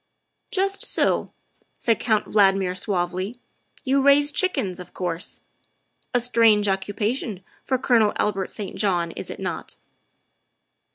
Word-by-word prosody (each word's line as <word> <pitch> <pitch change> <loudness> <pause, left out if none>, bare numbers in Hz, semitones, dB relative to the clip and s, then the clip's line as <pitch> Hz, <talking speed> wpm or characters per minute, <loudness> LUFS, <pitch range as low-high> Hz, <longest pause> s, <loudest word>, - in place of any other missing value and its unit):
" - - -52
Just 390 +1 0
so," - - +1 0.5
said 230 -2 +1
Count 215 -3 +1
Valdmir 195 -3 +3
suavely, 185 +3 -2 0.2
" - - -31
you 275 -1 +2
raise 285 +1 +5
chickens, 270 - 0
of 180 -1 -11
course. 175 -1 -3 0.7
A 245 - +2
strange 230 -3 +4
occupation 205 +1 -2 0.2
for 260 - +1
Colonel 235 -4 +3
Albert 195 -2 -1
St. 200 -3 -6
John, 175 -5 0
is - - -8
it - - -7
not?" - - -5
210 Hz, 130 wpm, -23 LUFS, 190-245 Hz, 0.7 s, raise